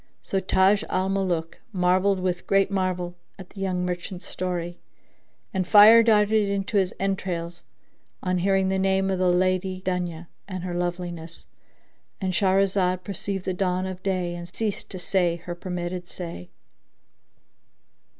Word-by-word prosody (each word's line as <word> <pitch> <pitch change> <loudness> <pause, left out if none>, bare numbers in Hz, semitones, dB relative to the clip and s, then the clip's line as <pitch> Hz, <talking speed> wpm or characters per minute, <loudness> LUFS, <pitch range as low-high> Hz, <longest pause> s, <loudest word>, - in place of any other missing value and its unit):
So 195 - -1
Taj 190 +2 +3
al 185 +1 0
Muluk 180 -4 -1
marvelled 185 +1 +2
with 180 -1 -2
great 195 0 +3
marvel 185 -2 -1 0.2
at 185 -2 -11
the 200 - -11
young 180 -2 -1
merchant's 180 0 -5
story, 175 -1 -4 0.7
and 185 -2 -1
fire 215 +3 +9
darted 215 -2 +3
into 200 +1 -1
his 190 -2 +2
entrails 175 -3 -3 0.6
on 185 -1 0
hearing 190 +1 +2
the 190 0 0
name 190 0 +2
of 190 - -1
the 185 -1 +3
Lady 185 +1 +1
Dunya 175 -2 -2 0.2
and 185 -2 -5
her 180 -1 -4
loveliness.—And 175 +1 -6
Shahrazad 190 -1 +2
perceived 195 -1 -4
the 185 - -1
dawn 185 0 0
of 185 -1 -6
day 185 -3 -1
and 175 0 -8
ceased 215 0 -3
to 190 - -6
say 180 -1 +1
her 175 +1 -7
permitted 175 0 -5
say. 130 - -7
185 Hz, 140 wpm, -25 LUFS, 175-195 Hz, 0.7 s, fire